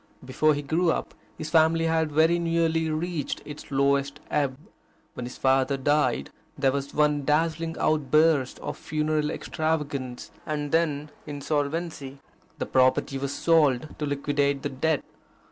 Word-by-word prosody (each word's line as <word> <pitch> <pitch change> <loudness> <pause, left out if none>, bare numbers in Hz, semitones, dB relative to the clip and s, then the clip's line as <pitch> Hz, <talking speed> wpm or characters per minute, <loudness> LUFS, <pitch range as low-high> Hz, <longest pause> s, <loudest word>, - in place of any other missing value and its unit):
Before 150 +4 +2
he 145 - -4
grew 165 +4 +2
up, - - -3 0.2
his 155 0 -6
family 165 0 +4
had 160 -1 +1
very 160 +3 +3
nearly 165 -1 +1
reached 160 0 -2
its 150 0 -9
lowest 140 +1 +1
ebb. 140 -3 0 0.6
When 120 - -5
his 125 - -9
father 135 +1 +2
died, 145 +3 +1 0.3
there 135 -2 +3
was 140 0 -3
one 150 -1 +2
dazzling 165 +2 0
outburst 155 -2 +2
of - - -5
funeral 155 0 -1
extravagance, 145 -5 -3
and 150 -2 -3
then 150 -3 0 0.2
insolvency. 145 0 -3 0.4
The - - -2
property 130 +1 +2
was 140 0 -3
sold 150 -3 +2
to 150 - -1
liquidate 140 -1 0
the - - -1
debt. 145 +2 0
150 Hz, 140 wpm, -26 LUFS, 140-160 Hz, 0.6 s, family